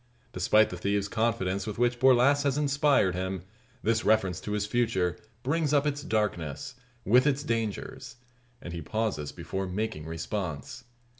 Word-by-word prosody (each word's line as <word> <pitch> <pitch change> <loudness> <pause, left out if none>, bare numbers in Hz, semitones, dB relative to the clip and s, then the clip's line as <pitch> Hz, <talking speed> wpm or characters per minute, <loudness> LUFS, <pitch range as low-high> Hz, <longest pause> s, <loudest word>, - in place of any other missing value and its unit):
Despite 105 +4 +3
the 90 - -5
thieve's 100 +2 0
confidence 100 -4 -1
with 105 +1 -4
which 120 0 +1
Borlasse 130 +2 +5
has 140 -1 +1
inspired 145 -8 +3
him, 95 0 -3 0.4
this 115 +1 +1
reference 95 -5 +2
to 105 - -4
his 105 -1 0
future 105 -6 +1 0.3
brings 150 +2 +1
up 145 0 +3
its 145 -1 -1
darkness, 105 - -2 0.3
with 125 +7 +5
its 140 0 +1
dangers; 115 +3 -3 0.5
and 85 - -6
he 85 - -5
pauses 110 -5 -2
before 95 0 -4
making 90 -5 -3
response. 90 - -5
110 Hz, 150 wpm, -28 LUFS, 95-130 Hz, 0.5 s, Borlasse